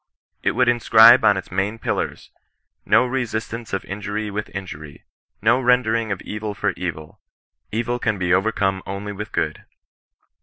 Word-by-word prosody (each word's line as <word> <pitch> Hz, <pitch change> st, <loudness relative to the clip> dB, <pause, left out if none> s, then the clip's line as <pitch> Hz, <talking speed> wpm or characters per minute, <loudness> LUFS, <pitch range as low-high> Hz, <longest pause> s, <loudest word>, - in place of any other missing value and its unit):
It -, -, +1 dB
would 125 Hz, -, +2 dB
inscribe 120 Hz, 0 st, +7 dB
on 100 Hz, -3 st, +5 dB
its 95 Hz, -, -7 dB
main 100 Hz, +4 st, -1 dB
pillars, -, -, -3 dB, 0.3 s
— -, -, -54 dB
No 125 Hz, -, +5 dB
resistance 115 Hz, -2 st, -4 dB
of 95 Hz, -, -3 dB
injury 105 Hz, +1 st, -4 dB
with 105 Hz, +1 st, -4 dB
injury 75 Hz, -7 st, -8 dB, 0.2 s
— -, -, -50 dB
no 130 Hz, -, +4 dB
rendering 115 Hz, -3 st, +2 dB
of 100 Hz, -, -4 dB
evil 105 Hz, 0 st, -5 dB
for -, -, 0 dB
evil 80 Hz, -4 st, -6 dB, 0.3 s
— -, -, -62 dB
evil 120 Hz, +2 st, -2 dB
can 110 Hz, -4 st, -1 dB
be 90 Hz, -1 st, +1 dB
overcome 95 Hz, -1 st, +1 dB
only 100 Hz, +1 st, -5 dB
with 105 Hz, +2 st, -7 dB
good! -, -, -2 dB
105 Hz, 165 wpm, -21 LUFS, 95-115 Hz, 0.3 s, inscribe